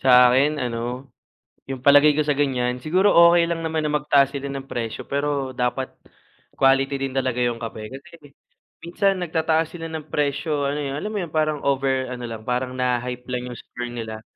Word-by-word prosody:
Sa 125 Hz, -1 st, +7 dB
akin 140 Hz, +4 st, +2 dB
ano, 125 Hz, +2 st, -4 dB, 0.6 s
yung 135 Hz, -2 st, -6 dB
palagay 145 Hz, +2 st, +6 dB
ko 155 Hz, -, +1 dB
sa 145 Hz, -2 st, 0 dB
ganiyan, 125 Hz, -3 st, 0 dB
siguro 180 Hz, +10 st, +2 dB, 0.2 s
okey 170 Hz, -1 st, +3 dB
lang 165 Hz, -1 st, -2 dB
naman 160 Hz, -1 st, -1 dB
na 150 Hz, -, -1 dB
magtaas 145 Hz, -2 st, +3 dB
sila 140 Hz, 0 st, -6 dB
ng 135 Hz, -1 st, -6 dB
presyo, 115 Hz, -2 st, -5 dB
pero 140 Hz, -2 st, -2 dB
dapat 125 Hz, +1 st, -1 dB, 0.6 s
quality 135 Hz, +1 st, +2 dB
din 135 Hz, -1 st, -2 dB
talaga 130 Hz, -2 st, 0 dB
yung 120 Hz, -1 st, 0 dB
kape. 110 Hz, -2 st, -7 dB
Kasi 175 Hz, +5 st, -17 dB, 0.7 s
minsan 195 Hz, +3 st, +1 dB
nagtataas 160 Hz, -2 st, 0 dB
sila 165 Hz, -2 st, -6 dB
ng 160 Hz, -2 st, -6 dB
presyo 145 Hz, 0 st, -1 dB
ano 145 Hz, -, -2 dB
yun 140 Hz, -1 st, -3 dB
alam 210 Hz, -, -4 dB
mo -, -, -2 dB
yung 165 Hz, -, -8 dB
parang 155 Hz, -2 st, 0 dB
over 135 Hz, -2 st, 0 dB
ano 125 Hz, -1 st, -6 dB
lang, 110 Hz, -1 st, -7 dB
parang 125 Hz, +1 st, -2 dB
naha-hype 125 Hz, 0 st, -2 dB
lang 125 Hz, 0 st, -4 dB
yung 120 Hz, -, -8 dB
store 120 Hz, +2 st, -7 dB
nila. 110 Hz, -2 st, -6 dB
135 Hz, 190 wpm, -23 LUFS, 125-150 Hz, 0.7 s, Sa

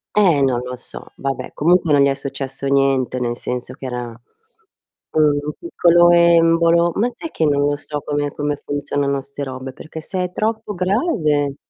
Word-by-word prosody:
Eh, 180 Hz, -9 st, +4 dB
non 130 Hz, -3 st, +2 dB
lo 125 Hz, +1 st, -6 dB
so, 125 Hz, -, -10 dB
vabbè 135 Hz, -2 st, -4 dB
comunque 170 Hz, 0 st, +3 dB
non 145 Hz, -, +5 dB
gli 140 Hz, -, +5 dB
è -, -, +2 dB
successo 135 Hz, 0 st, -5 dB
niente, 135 Hz, -2 st, +1 dB
nel 120 Hz, -1 st, -2 dB
senso 125 Hz, 0 st, -5 dB
che 135 Hz, -, -10 dB
era 125 Hz, -1 st, -4 dB, 1.0 s
un 150 Hz, -1 st, +2 dB
piccolo 175 Hz, -, +4 dB
embolo. 170 Hz, 0 st, +4 dB
Ma 235 Hz, +4 st, +1 dB
sai 245 Hz, +7 st, -8 dB
che 160 Hz, -, -1 dB
non 145 Hz, -1 st, +2 dB
lo 145 Hz, -, +1 dB
so 145 Hz, 0 st, -5 dB
come 145 Hz, -1 st, -1 dB
come 145 Hz, 0 st, -2 dB
funzionano 145 Hz, -1 st, -1 dB
'ste 140 Hz, +1 st, -7 dB
robe, 130 Hz, -1 st, -6 dB
perché 155 Hz, +3 st, -9 dB
se 185 Hz, +3 st, -3 dB
è 180 Hz, -, -4 dB
troppo 220 Hz, +2 st, -2 dB
grave 175 Hz, -, 0 dB
145 Hz, 175 wpm, -19 LUFS, 135-170 Hz, 1.0 s, non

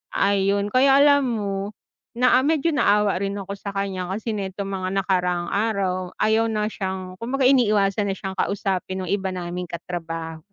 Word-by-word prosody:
Ayun, 200 Hz, +1 st, +1 dB
kaya 270 Hz, +3 st, +5 dB
alam 285 Hz, -1 st, +5 dB
mo, 200 Hz, -3 st, -3 dB, 0.4 s
na 250 Hz, +1 st, +4 dB
ah, -, -, +1 dB
medyo 320 Hz, +1 st, +2 dB
naawa 210 Hz, -8 st, +3 dB
rin 200 Hz, 0 st, -2 dB
ako 200 Hz, 0 st, -5 dB
sa 200 Hz, -, -5 dB
kaniya 195 Hz, -2 st, -2 dB
kasi 220 Hz, +4 st, -3 dB
nitong 195 Hz, -1 st, -4 dB
mga 185 Hz, 0 st, -2 dB
nakaraang 180 Hz, -2 st, 0 dB
araw, 195 Hz, -4 st, -1 dB
ayaw 220 Hz, +1 st, +3 dB
na 215 Hz, -1 st, 0 dB
siyang 190 Hz, -2 st, -4 dB
kumbaga 265 Hz, +4 st, -1 dB
iniiwasan 210 Hz, -6 st, +3 dB
na 195 Hz, -, -1 dB
siyang 190 Hz, 0 st, -5 dB
kausapin 190 Hz, -1 st, -1 dB
nung 180 Hz, -, -4 dB
iba 195 Hz, -1 st, 0 dB
naming 180 Hz, 0 st, -4 dB
katraba 165 Hz, -2 st, -5 dB
200 Hz, 165 wpm, -23 LUFS, 185-220 Hz, 0.4 s, kaya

